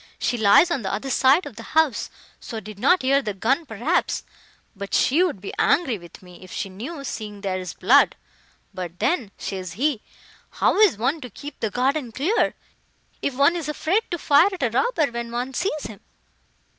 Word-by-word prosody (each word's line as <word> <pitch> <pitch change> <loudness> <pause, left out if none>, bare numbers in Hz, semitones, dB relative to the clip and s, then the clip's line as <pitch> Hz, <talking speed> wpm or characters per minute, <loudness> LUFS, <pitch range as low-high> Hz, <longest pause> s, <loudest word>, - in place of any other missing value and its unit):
She - - -1
lies 225 - +5
on 280 - 0
the 190 - -3
other 215 +7 -3
side 270 +8 +4
of 210 - -10
the - - -7 0.2
house, 315 -6 +2 0.3
so 225 - -6
did 210 -1 -11
not 360 - +3
hear 275 +2 +3
the 210 -6 -4
gun, 270 - 0
perhaps; 245 - -1 0.5
but 200 0 -4
she 300 +7 +3
would 355 - 0
be 195 - -7
angry 265 - +2
with 170 +2 -14
me, 180 -1 -14
if 185 - -13
she 195 - -4
knew, 265 - -7
seeing 210 -6 -6
there 190 -2 -2
is 185 -1 -7
blood. - - +4 0.6
But 180 -2 -6
then,' 245 - 0
says 185 -3 -5
he, 260 - 0 0.5
'how - - +1
is 420 - +5
one 270 +8 0
to 250 - -7
keep 285 +7 -10
the 220 - -1
garden 255 +2 0
clear, 325 - +1 0.7
if 280 - -2
one 280 +6 +4
is 330 -3 -3
afraid 340 +7 +1
to 345 - -2
fire 300 +4 +5
at 370 -6 -5
a 240 - +1
robber, 310 - +1
when 235 0 -5
one 245 +3 -3
sees 310 -1 -2
him? 215 -3 -8
250 Hz, 195 wpm, -23 LUFS, 205-305 Hz, 0.7 s, lies